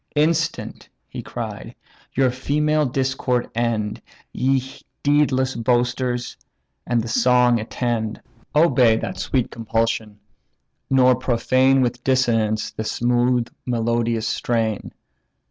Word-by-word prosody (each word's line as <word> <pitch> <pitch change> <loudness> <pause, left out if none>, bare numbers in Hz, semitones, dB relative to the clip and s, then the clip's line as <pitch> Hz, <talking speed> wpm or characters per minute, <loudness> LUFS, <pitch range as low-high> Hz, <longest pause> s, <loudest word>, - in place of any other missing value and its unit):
"Instant 160 +2 0 0.2
(he - - -7
cried) - - -7 0.4
your 130 -1 +3
female 150 +3 0
discord 130 -1 -1
end, 115 -3 -1 0.3
Ye 135 +1 +2 0.4
deedless 140 -3 +2
boasters! 120 +1 0 0.5
and 120 -2 +1
the - - -5
song 125 0 +3
attend; 110 0 -2 0.4
Obey 135 -8 +5
that - - -5
sweet 130 -3 -1
compulsion, 115 -2 -2 0.7
nor 130 -1 +5
profane 130 +2 +2
With 120 -1 -1
dissonance 115 -5 +1
the 110 - -5
smooth 120 +2 +1 0.2
melodious 115 -1 0
strain. 110 -2 -1
120 Hz, 100 wpm, -22 LUFS, 115-130 Hz, 0.7 s, Obey